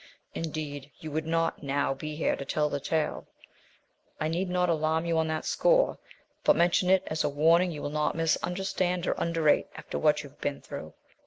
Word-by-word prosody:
Indeed, 150 -3 -5
you 155 - -7
would 155 +1 -2
not 165 0 0
now 140 -1 0
be 150 +3 -6
here 155 - +1
to - - -6
tell 150 +2 0
the 145 - -2
tale. 155 +2 -1 0.9
I 155 - 0
need 180 +3 -1
not 180 0 +1
alarm 160 0 +1
you 170 -1 0
on 160 - +1
that 160 0 -2
score, - - +3 0.4
but 300 - +5
mention 175 +1 +3
it 190 0 +5
as 155 0 -1
a - - +1
warning 165 +5 +4
you 150 -3 -6
will 145 - -3
not 150 0 0
misunderstand 180 +2 0
or - - +1
underrate 165 -3 +2
after - - -5
what 150 -1 +3
you 145 - -10
have 145 - -26
been 145 -1 -2
through. - - -8
160 Hz, 195 wpm, -28 LUFS, 150-170 Hz, 0.9 s, but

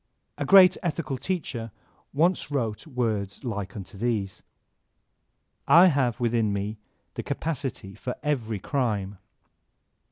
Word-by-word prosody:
A - - -1
great 190 -2 +8
ethical 155 -5 -2
teacher 135 -11 -3 0.4
once 165 +2 +1
wrote 120 -4 -2
words 110 -7 -2
like 105 -6 -4
unto 100 0 -9
these: 105 -5 -1 1.3
"I 180 +3 +8
have 130 -7 +1
within 115 -3 +1
me 100 +2 -3 0.3
the - - -4
capacity 135 -10 -4
for 125 - -5
every 120 -8 -1
crime." 105 -5 -2
120 Hz, 115 wpm, -26 LUFS, 105-145 Hz, 1.3 s, great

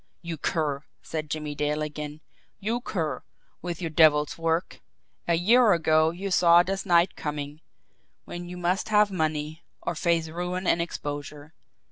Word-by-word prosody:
"You 170 -1 -4
cur!" 150 -2 -1 0.2
said 155 -2 -5
Jimmie 150 -1 -3
Dale 150 +1 -1
again. 150 0 -6 0.4
"You 225 +4 -2
cur, 160 - -3 0.4
with 175 -1 -5
your 165 -2 -3
devil's 150 -2 +4
work! 165 +1 -1 0.5
A 170 - +3
year 220 +6 +5
ago 160 -1 +3
you 190 +4 -5
saw 175 -1 +6
this 195 +2 -3
night 175 0 +4
coming 150 0 -5 0.6
when 175 0 -7
you 180 - -7
must 180 +4 -1
have 210 -1 +4
money, 155 -2 -2 0.2
or - - -3
face 165 0 +1
ruin 180 +3 -4
and 170 - +3
exposure. 145 -2 -6
165 Hz, 150 wpm, -26 LUFS, 150-180 Hz, 0.6 s, saw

